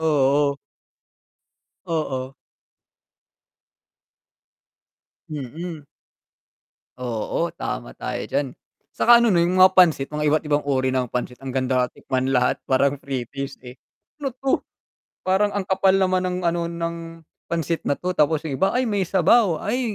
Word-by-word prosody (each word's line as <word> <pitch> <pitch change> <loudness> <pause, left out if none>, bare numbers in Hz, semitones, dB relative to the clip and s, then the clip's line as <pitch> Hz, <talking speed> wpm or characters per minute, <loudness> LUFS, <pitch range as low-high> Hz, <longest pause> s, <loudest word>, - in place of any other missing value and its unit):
oo. 145 -2 +2 1.3
Oo. 135 -5 -3 3.0
Mm. 155 +3 -6 1.2
Oo, 120 -4 -2
tama - - -5
tayo - - -4
diyan. 140 -3 0 0.4
'tsaka 240 0 +6
ano 235 -3 +3
na 170 - +4
yung 175 +2 +1
mga 185 0 +7
pansit 165 -7 +5
mga 150 0 +1
iba't 155 +1 +2
ibang 150 0 +1
uri 130 -2 0
ng 130 -2 0
pansit, 125 +1 -4
ang 135 - -6
ganda, 130 -1 0
tikman 130 0 -2
lahat 125 -1 +1
parang 140 +1 +2
free 130 -3 -3
taste, 140 +3 -6
eh. 125 - -8 0.5
Ano 275 - -1
'to? 270 +1 0 0.6
Parang 190 +2 +3
ang 205 -2 -3
kapal 190 0 +3
naman 185 -1 +2
ng 180 0 -2
ano, 170 0 0
ng 170 0 -3 0.5
pansit 165 0 -1
na 145 - +1
'to, 180 0 -2
tapos 155 0 +1
yung 150 - -3
iba 195 - +4
ay 255 +1 0
may 205 -4 0
sabaw, 190 +1 +3
ay 245 +5 0
155 Hz, 140 wpm, -23 LUFS, 135-185 Hz, 3.0 s, mga